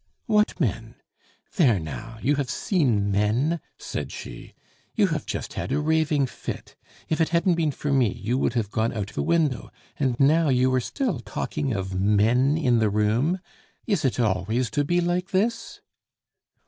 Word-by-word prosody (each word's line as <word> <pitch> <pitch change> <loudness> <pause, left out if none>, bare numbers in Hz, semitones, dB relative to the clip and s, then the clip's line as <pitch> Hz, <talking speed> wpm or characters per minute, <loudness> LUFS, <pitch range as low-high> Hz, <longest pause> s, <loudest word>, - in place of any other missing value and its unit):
"What 210 -2 +2
men? - - -2 0.6
There, 130 - +5
now, 110 +9 -7
you 140 +3 +2
have 140 -3 -2
seen 120 - +1
men," 115 +12 +1 0.2
said - - -5
she. - - -9 0.4
"You - - +4
have - - -3
just - - -4
had - - -4
a 140 - +1
raving 155 -2 +2
fit; 125 - -7 0.3
if 160 +1 0
it 160 - +2
hadn't 170 +2 +2
been 165 -2 +1
for 145 0 -2
me 125 -7 +3
you 115 +3 -3
would - - +1
have 110 -4 -1
gone 110 0 0
out 105 -3 -3
the - - -2
window, 160 -6 +1 0.3
and 130 -4 0
now 155 +3 +4
you 130 0 +3
are 130 - +2
still 255 - -2
talking 145 -4 -3
of 95 -3 -3
men 110 +9 +3
in 125 -7 +2
the 110 -1 +2
room. 115 - +1 0.4
Is 200 -8 0
it 130 -2 0
always 110 +3 0
to 145 - +1
be 175 +4 +1
like 175 +2 -1
this?" 220 +5 -1
130 Hz, 175 wpm, -25 LUFS, 110-160 Hz, 0.6 s, There